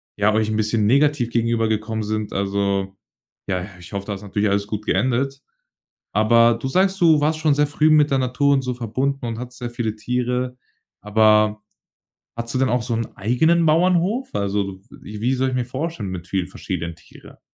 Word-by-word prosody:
ja, 105 +1 +2
euch 110 0 +1
'n 110 - -1
bisschen 110 -1 +1
negativ 140 -1 +3
gegenübergekommen 115 -2 0
sind. 110 0 -3
Also 100 0 -1 0.5
ja, 90 -1 -1 0.2
ich 85 - -12
hoffe, 100 0 -4
da 105 - -3
ist 100 - -9
natürlich 105 +1 -1
alles 100 0 0
gut 105 0 -5
geendet. 135 +2 0 0.7
Aber 115 +2 +4
du 135 - -2
sagst, 190 +6 +1
du 160 -3 +5
warst 155 +1 +1
schon 155 -2 +3
sehr 150 - +3
früh 150 +2 +2
mit 150 -2 +4
der 135 - +2
Natur 130 +3 +2
und 135 - +2
so 125 -1 -3
verbunden 130 +3 -2
und 115 -1 -4
hattest 125 0 -8
sehr 120 -1 -4
viele 110 -3 -3
Tiere. 125 +2 -2 0.4
Aber 105 0 +3 0.7
hattest 115 +2 -5
du - - +1
denn 130 - +2
auch 125 0 +1
so 115 -1 -1
'nen 115 0 -4
eigenen 160 +11 +2
Bauernhof? 180 +9 +2
Also 100 -1 -2
wie 105 +1 -10
wie 125 +3 +1
soll 130 +1 0
ich 130 - -3
mir 125 - -1
vorstellen, 130 - -4
mit 90 -1 -6
vielen 95 -1 -1
verschiedenen 85 -1 -5
Tiere? - - -17
115 Hz, 190 wpm, -21 LUFS, 105-135 Hz, 0.7 s, du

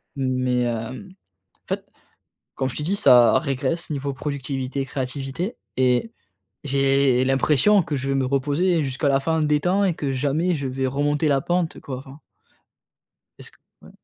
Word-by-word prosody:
mais 130 -2 0
heu, 120 - -5
en 185 - -24 0.4
fait, - - -3 0.7
comme 130 - -1
je - - -5
t'ai 150 - -3
dit, 190 - 0
ça 125 -11 +6
régresse 160 +4 -2
niveau 140 -1 -2
productivité, 135 -1 -4
créativité 135 - -4 0.2
et 130 - +1 0.5
j'ai 135 -2 +2
l'impression 150 +9 +3
que 150 -2 -4
je 135 +1 -3
vais 135 - 0
me 135 -1 0
reposer 145 +6 +1
jusqu'à 135 +2 -1
la 135 0 +3
fin 160 +3 0
des 150 0 +2
temps 185 +6 +1
et 180 - +1
que 140 -3 -3
jamais 150 +7 0
je 140 - -4
vais 130 +1 -2
remonter 145 +3 0
la 140 -1 +2
pente 175 +1 -1
quoi, 130 -2 -6
enfin 135 +3 -13 1.2
Est - - -11
ce - - -10
que - - -26 0.2
ouais. - - -15
140 Hz, 170 wpm, -23 LUFS, 130-155 Hz, 1.2 s, ça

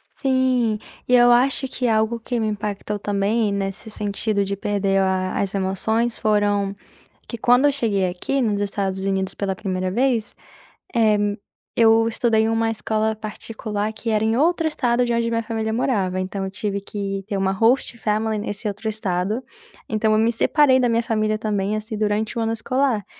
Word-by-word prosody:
Sim, 255 -5 +1 0.3
e 250 - +1
eu 245 0 +6
acho 265 +2 +3
que 250 -1 -2
algo 220 +1 +1
que 240 +1 -3
me 220 - 0
impactou 210 0 -3
também 205 +2 0
nesse 195 +2 -4
sentido 205 0 -1
de 200 0 -2
perder 200 -1 0
a 185 -1 0
as 195 -1 -1
emoções, 220 +5 0
foram 205 -2 +1 0.5
que, 235 - -5
quando 245 +4 +4
eu 290 - +5
cheguei 215 -9 0
aqui 230 +10 -2
nos 210 -4 0
Estados 195 -1 -2
Unidos 190 -1 -1
pela 195 -2 -2
primeira 185 -2 -2
vez, 240 0 0 0.6
eh, 220 -2 +4 0.6
eu 225 0 +5
estudei 225 -1 +2
numa 225 0 +1
escola 220 0 -1
particular 215 0 -4
que 225 +1 -5
era 215 -1 +1
em 220 +1 +2
outro 330 +2 +2
estado 245 -5 +1
de 240 - 0
onde 230 0 +1
minha 230 0 -1
família 220 -1 -2
morava, 200 -6 0
então 190 +1 -3
eu 190 - -3
tive 200 -1 -3
que 195 -1 -4
ter 205 -2 -2
uma 190 0 +1
host 230 +5 +2
family 215 0 0
nesse 205 +1 -4
outro 205 +2 -3
estado. 210 +1 -1 0.5
Então 215 0 +1
eu 215 - +4
me 225 +2 +3
separei 260 +2 +4
da 245 - +2
minha 230 0 +1
família 215 -1 0
também, 210 -1 -1
assim, 215 +1 -5
durante 215 +1 -1
o - - 0
ano 225 0 0
escolar. 250 -2 0
215 Hz, 180 wpm, -22 LUFS, 200-230 Hz, 0.6 s, eu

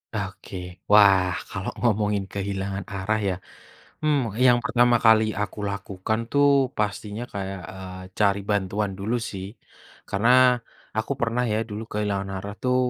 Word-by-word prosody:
Oke. 100 -1 -5 0.4
Wah 95 -3 +6 0.2
kalau - - -3
ngomongin 105 -3 +2
kehilangan 100 -1 -3
arah 105 +3 0
ya, - - 0 0.7
hmm, 150 -2 +3 0.3
yang 120 -1 +6
pertama 120 0 +4
kali 110 -1 +7 0.2
aku 105 - -4
lakukan 100 +2 -3
tuh 145 0 +4 0.3
pastinya 105 +1 -2
kayak, 95 -1 -4
eee, 95 -1 -8 0.2
cari 100 -1 +3
bantuan 100 0 0
dulu 110 +5 -1 0.2
sih. 95 -1 -6 0.6
Karena 105 +5 +2 0.7
aku 110 +4 -1
pernah 120 +1 +1
ya - - +1
dulu 105 +2 -5
kehilangan 100 -2 -1
arah 100 +2 -6
tuh 125 0 +2
105 Hz, 135 wpm, -25 LUFS, 95-110 Hz, 0.7 s, kali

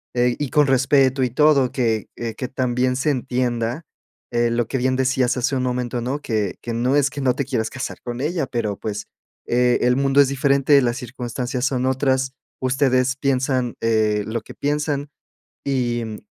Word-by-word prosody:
eh, 120 0 +2
y 145 -2 -2
con 150 -1 +4
respeto. 135 0 +3
Y 125 - 0
todo 140 -1 +4
que, 115 -4 0
eh, 115 -2 -4
que 125 - -4
también 125 -1 0
se 140 +3 0
entienda, 125 -1 -1 0.5
eh, 120 -1 +1
lo 120 -1 0
que 135 - -2
bien 130 +1 +1
decías 130 -1 +1
hace 130 +2 0
un 130 - 0
momento, 125 -1 -2
¿no? 130 +5 -2
Que 110 -7 -1
que 120 - -4
no 125 +4 +1
es 145 -1 +3
que 145 -1 -6
no 130 -2 +2
te 140 - -2
quieras 115 -5 -1
casar 130 - -5
con 120 0 -5
ella, 160 +1 -1
pero, 115 -5 -2
pues, 105 -1 -4 0.4
e 125 0 +3
el 125 0 +3
mundo 135 +1 +4
es 140 - +4
diferente, 140 +1 +3
las 120 0 0
circunstancias 125 0 -4
son 130 -1 0
otras. 130 0 +1 0.3
Ustedes 130 0 +2
piensan, 130 -2 0
eh, 110 -2 +2
lo 115 +1 -2
que - - -12
piensan, 145 0 -1 0.6
y, 120 -4 0
mm, 110 -1 -6
130 Hz, 185 wpm, -21 LUFS, 120-135 Hz, 0.6 s, con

